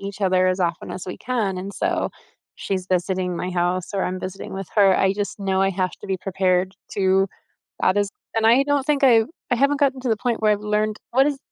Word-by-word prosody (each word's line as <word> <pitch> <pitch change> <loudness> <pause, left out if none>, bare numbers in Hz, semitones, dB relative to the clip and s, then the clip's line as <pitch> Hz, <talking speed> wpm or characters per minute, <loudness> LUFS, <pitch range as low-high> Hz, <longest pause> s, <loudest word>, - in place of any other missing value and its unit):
each 200 +1 -7
other 185 -1 +3
as 185 +1 0
often 170 -1 -1
as 185 - -6
we 180 - -5
can, 220 -7 -1
and 195 +2 -6
so - - 0 0.5
she's 185 -2 -3
visiting 180 0 0
my 180 +2 -3
house, 180 0 0
or 195 - 0
I'm 185 0 -2
visiting 185 +1 -7
with 195 0 -5
her, 195 -3 +5
I 190 0 +3
just 205 +1 -4
know 190 -1 0
I 195 - +3
have 185 -1 -1
to - - -9
be 190 - 0
prepared 185 -1 0 0.2
to, 195 0 +2 0.5
uh, 185 - +4
those 205 0 +1 0.3
and 225 0 +2
I 240 +4 +6
don't 285 -1 0
think 290 -2 +1
I've 230 -4 +6 0.3
I - - +4
haven't 280 +3 +2
gotten 270 -2 +2
to 255 - -2
the 220 - +2
point 240 -2 -1
where 215 - +5
I've 205 - +1
learned 210 0 0
what 265 +3 +4
is 290 -1 0
195 Hz, 235 wpm, -22 LUFS, 185-225 Hz, 0.5 s, I